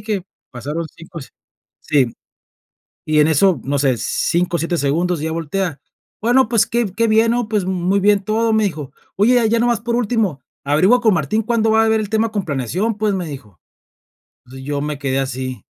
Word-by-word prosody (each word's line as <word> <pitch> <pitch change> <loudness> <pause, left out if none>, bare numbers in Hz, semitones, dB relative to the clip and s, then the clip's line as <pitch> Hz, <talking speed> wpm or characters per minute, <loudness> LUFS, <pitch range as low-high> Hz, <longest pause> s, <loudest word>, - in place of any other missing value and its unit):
tiqui, 185 -2 -6 0.3
pasaron 145 +7 -4
5 165 +1 -10
se 135 - -12 0.5
sí, 135 -6 +1 0.9
y 155 0 +3
en 150 - +4
eso, 170 +4 +3
no 140 +1 -1
sé, 135 -2 +2
5, 175 +9 0
7 170 +1 -1
segundos 165 +4 0
y - - -2
ya 160 - -2
voltea. 165 0 -3 0.4
"Bueno, 245 +1 +3
pues, 230 -3 +3
qué 235 -1 0
qué 230 0 +2
bien, 225 +1 +3
¿no?, 240 -1 0
pues, 210 -3 0
muy 185 +1 0
bien 200 0 +3
todo", 225 +2 +1
me 220 0 +2
dijo. 155 -8 -4 0.3
"Oye, 235 +3 +4
ya 230 - +2
nomás 240 -3 +1
por 235 +2 -2
último, 220 - 0 0.2
averigua 180 - +3
con 220 -3 +4
Martín 180 +7 0
cuándo 225 -1 +1
va 220 0 +4
a - - +2
ver 220 0 +2
el 210 - -4
tema 220 0 +1
con 205 -3 -2
planeación", 160 - -2
pues, 215 -1 +1
me 180 -2 -3
dijo. 110 - -10 0.9
Entonces, 130 +1 -11
yo 145 -1 -2
me 150 -1 -4
quedé 135 -1 -1
así. 130 -1 -5
185 Hz, 200 wpm, -19 LUFS, 145-220 Hz, 0.9 s, en